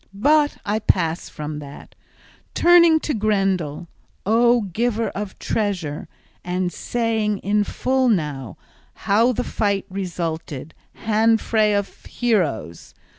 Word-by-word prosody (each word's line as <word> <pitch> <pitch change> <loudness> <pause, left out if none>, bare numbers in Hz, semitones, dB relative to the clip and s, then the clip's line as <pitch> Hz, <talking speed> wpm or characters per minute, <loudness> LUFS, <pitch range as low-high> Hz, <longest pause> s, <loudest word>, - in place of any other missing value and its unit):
But 295 +7 +3
I 210 +1 0
pass 170 -5 0
from 150 -1 -6
that, 145 -1 -11 0.6
turning 340 -2 +6
to 300 - -2
Grendel, 195 -7 0 0.4
O 235 +3 +4
giver 225 +3 -1
of 200 -1 -6
treasure, 185 -9 -2 0.4
and 180 0 -2
saying 225 -3 -1
in 205 +1 +2
full 195 - -1 0.4
how 225 +5 +2
the 245 - -2
fight 200 -2 -1
resulted, 165 -5 -4 0.3
hand 225 +1 +3
fray 215 -2 +2
of 200 -1 -4
heroes. 150 - -2
205 Hz, 110 wpm, -22 LUFS, 170-225 Hz, 0.6 s, turning